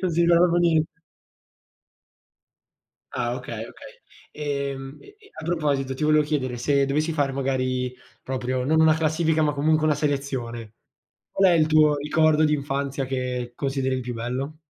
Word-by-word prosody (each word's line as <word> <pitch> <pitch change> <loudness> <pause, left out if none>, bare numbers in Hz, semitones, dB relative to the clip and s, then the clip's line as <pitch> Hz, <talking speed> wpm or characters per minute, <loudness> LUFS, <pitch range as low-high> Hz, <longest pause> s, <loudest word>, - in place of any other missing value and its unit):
Non 185 - +1
si 165 +1 0
ricorda 170 0 +5
proprio 175 0 +2
niente. 165 -2 +1 2.1
Ah 120 0 -2
okay, 115 -3 -6
okay. - - -13 0.4
Ehm, 140 -2 -4
e 405 0 -17
e 410 -1 -20
a - - -8
proposito, 145 -5 -1
ti 130 - -4
volevo 155 0 +4
chiedere, 135 -5 -2
se 140 +3 +2
dovessi 150 +4 0
fare 145 -3 0
magari 130 -2 -1 0.3
proprio 130 -1 -2
non 160 +4 +2
una 160 -1 +5
classifica, 160 0 +1
ma 150 -1 +1
comunque 155 +2 +2
una 155 - +3
selezione, 135 -6 -3 0.6
qual 195 -2 +4
è - - +4
il 155 -2 +3
tuo 155 -1 +4
ricordo 155 +1 +2
d'infanzia 140 -2 -1
che 125 -2 -3
consideri 135 -1 -1
il 130 - -3
più 125 0 -5
bello? 125 +6 -4
140 Hz, 160 wpm, -24 LUFS, 130-155 Hz, 2.1 s, ricorda